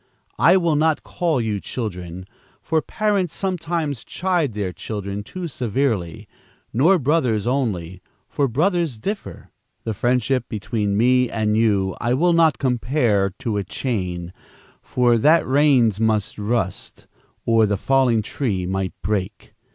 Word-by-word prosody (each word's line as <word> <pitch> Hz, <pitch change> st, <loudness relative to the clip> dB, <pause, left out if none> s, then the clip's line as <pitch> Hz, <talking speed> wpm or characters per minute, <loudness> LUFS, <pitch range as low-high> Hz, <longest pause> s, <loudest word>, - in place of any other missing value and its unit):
I 175 Hz, +4 st, +6 dB
will 170 Hz, -4 st, +1 dB
not 155 Hz, +1 st, +1 dB
call 165 Hz, -6 st, -1 dB
you 110 Hz, -3 st, -1 dB
children, 90 Hz, -6 st, -6 dB, 0.4 s
for 160 Hz, -1 st, +1 dB
parents 205 Hz, -5 st, -1 dB
sometimes 165 Hz, -, -2 dB
chide 175 Hz, -, -1 dB
their 100 Hz, -3 st, -3 dB
children 100 Hz, +2 st, -5 dB
too 180 Hz, -, -6 dB
severely, 115 Hz, -, -2 dB, 0.5 s
nor 160 Hz, -, +4 dB
brothers 130 Hz, -, +1 dB
only, 95 Hz, -9 st, -2 dB, 0.3 s
for 140 Hz, -, 0 dB
brothers 160 Hz, -, 0 dB
differ. 200 Hz, -, -6 dB, 0.3 s
The 110 Hz, -, -2 dB
friendship 125 Hz, +3 st, +1 dB
between 105 Hz, -1 st, -2 dB
me 125 Hz, +2 st, +3 dB
and 110 Hz, -1 st, 0 dB
you, 100 Hz, -4 st, +2 dB
I 120 Hz, +1 st, +1 dB
will 170 Hz, +5 st, +3 dB
not 165 Hz, -3 st, +4 dB
compare 120 Hz, -5 st, +1 dB
to 115 Hz, -6 st, -2 dB
a 100 Hz, -, -1 dB
chain, 90 Hz, -5 st, -3 dB, 0.5 s
for 120 Hz, -2 st, +2 dB
that 155 Hz, +8 st, +4 dB
rains 130 Hz, -7 st, +3 dB
might 110 Hz, -2 st, +1 dB
rust, 105 Hz, -3 st, -3 dB, 0.4 s
or 115 Hz, -2 st, +4 dB
the 100 Hz, -1 st, 0 dB
falling 125 Hz, -1 st, +2 dB
tree 100 Hz, -6 st, -2 dB
might 95 Hz, 0 st, -2 dB
break. 100 Hz, +1 st, -3 dB
120 Hz, 135 wpm, -21 LUFS, 105-150 Hz, 0.5 s, I